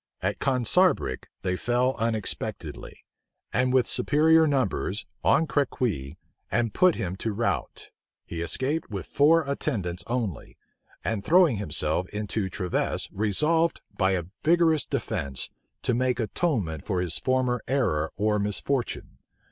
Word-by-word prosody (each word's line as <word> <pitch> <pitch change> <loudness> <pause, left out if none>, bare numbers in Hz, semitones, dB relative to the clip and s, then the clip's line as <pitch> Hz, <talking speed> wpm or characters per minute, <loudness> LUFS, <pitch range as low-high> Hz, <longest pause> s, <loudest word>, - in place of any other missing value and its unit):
At 100 +2 -1
Consarbric 130 - +2 0.2
they 90 -1 0
fell 125 +5 +1
unexpectedly, 110 -2 -4 0.5
and 125 +3 +2
with 130 -1 +4
superior 160 +2 +4
numbers, 125 -7 0 0.2
on 165 - +4
Crequi, 105 - -1 0.3
and 115 +1 +1
put 185 -2 +4
him 90 0 -3
to 110 - -2
rout. 115 +3 -2 0.4
He 85 - -5
escaped 130 - -1
with 100 -4 -5
four 160 +4 +4
attendants 100 - -2
only; 115 - -3 0.5
and 110 -3 -2
throwing 170 - +5
himself 90 -1 -2
into 105 -1 -3
Treves, 90 -1 -1
resolved, 150 - +1
by 95 0 +2
a 90 -2 0 0.2
vigorous 160 -1 +3
defence, 85 - -3 0.3
to 125 - +1
make 125 +1 +1
atonement 105 - -1
for 95 -3 -1
his 90 -3 -1
former 130 -2 +1
error 110 - +1
or 105 0 +1
misfortune. 115 +5 -2
115 Hz, 125 wpm, -26 LUFS, 95-140 Hz, 0.5 s, throwing